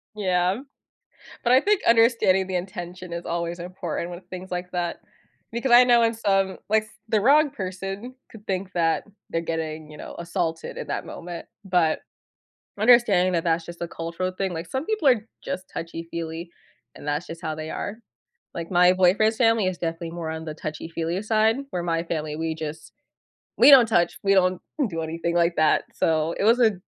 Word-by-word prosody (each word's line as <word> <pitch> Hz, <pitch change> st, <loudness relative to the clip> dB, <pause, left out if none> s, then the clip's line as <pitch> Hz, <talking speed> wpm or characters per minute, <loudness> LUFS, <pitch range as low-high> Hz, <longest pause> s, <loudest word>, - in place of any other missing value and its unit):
Yeah, 185 Hz, -1 st, +1 dB, 0.9 s
but 240 Hz, -, +3 dB
I 260 Hz, -, +7 dB
think 415 Hz, +3 st, +2 dB
understanding 225 Hz, -5 st, +4 dB
the 185 Hz, -1 st, -2 dB
intention 180 Hz, -1 st, -6 dB
is 170 Hz, 0 st, -4 dB
always 170 Hz, +1 st, -3 dB
important 175 Hz, -1 st, -4 dB
with 175 Hz, +1 st, -9 dB
things 185 Hz, 0 st, -8 dB
like 180 Hz, 0 st, -4 dB
that 175 Hz, -1 st, -2 dB, 0.5 s
because 235 Hz, +3 st, -2 dB
I 245 Hz, +1 st, +9 dB
know 240 Hz, -1 st, +5 dB
in 230 Hz, 0 st, +2 dB
some, 195 Hz, -3 st, +1 dB
like, 215 Hz, 0 st, +3 dB
s -, -, -18 dB, 0.2 s
the 215 Hz, -2 st, +2 dB
wrong 290 Hz, +6 st, +5 dB
person 195 Hz, +1 st, -6 dB, 0.2 s
could 215 Hz, -2 st, -14 dB
think 190 Hz, 0 st, -3 dB
that 165 Hz, -2 st, +1 dB, 0.3 s
they're 165 Hz, -, 0 dB
getting, 160 Hz, -2 st, -4 dB
you 150 Hz, -, -11 dB
know, -, -, -8 dB
assaulted 170 Hz, -2 st, -3 dB
in -, -, -5 dB
that -, -, -3 dB
moment, 170 Hz, -1 st, -7 dB, 0.2 s
but 175 Hz, -4 st, +2 dB, 0.8 s
understanding 210 Hz, -5 st, +5 dB
that 170 Hz, -1 st, 0 dB
that's 165 Hz, 0 st, +1 dB
just 170 Hz, +1 st, -10 dB
a 170 Hz, -, -3 dB
cultural 170 Hz, +3 st, -3 dB
thing 195 Hz, -2 st, -1 dB
like, 165 Hz, 0 st, -5 dB
some 265 Hz, +3 st, -2 dB
people 425 Hz, -10 st, +2 dB
are 230 Hz, -4 st, +3 dB, 0.2 s
just 185 Hz, +1 st, -5 dB
touchy-feely, 165 Hz, 0 st, -6 dB, 0.4 s
and -, -, -11 dB
that's 145 Hz, +4 st, -1 dB
just 165 Hz, 0 st, -8 dB
how 155 Hz, -1 st, -2 dB
they 155 Hz, 0 st, -6 dB
are. 205 Hz, -, -4 dB, 0.6 s
Like, 170 Hz, +1 st, -6 dB
my 180 Hz, +1 st, +6 dB
boyfriend's 200 Hz, +5 st, +3 dB
family 225 Hz, -5 st, +3 dB
is 185 Hz, -, -2 dB
definitely 165 Hz, 0 st, -4 dB
more 170 Hz, -2 st, -5 dB
on 160 Hz, 0 st, -5 dB
the 155 Hz, -, -5 dB
touchy 155 Hz, +1 st, -6 dB
feely-side, 210 Hz, +8 st, +1 dB
where 175 Hz, -1 st, -2 dB
my 165 Hz, -1 st, 0 dB
family, 155 Hz, -3 st, -3 dB
we 160 Hz, 0 st, -2 dB
just 160 Hz, 0 st, -7 dB, 0.6 s
we 290 Hz, -, +8 dB
don't 250 Hz, -4 st, +9 dB
touch. 175 Hz, -5 st, +2 dB
We 195 Hz, 0 st, +4 dB
don't 185 Hz, -1 st, +3 dB, 0.3 s
do 165 Hz, -2 st, -3 dB
anything 165 Hz, +1 st, -3 dB
like 170 Hz, 0 st, +2 dB
that, 155 Hz, 0 st, +3 dB
so, 160 Hz, 0 st, +1 dB
it -, -, +1 dB
was 235 Hz, +3 st, +5 dB
a 220 Hz, -3 st, +5 dB
180 Hz, 190 wpm, -24 LUFS, 165-210 Hz, 0.9 s, I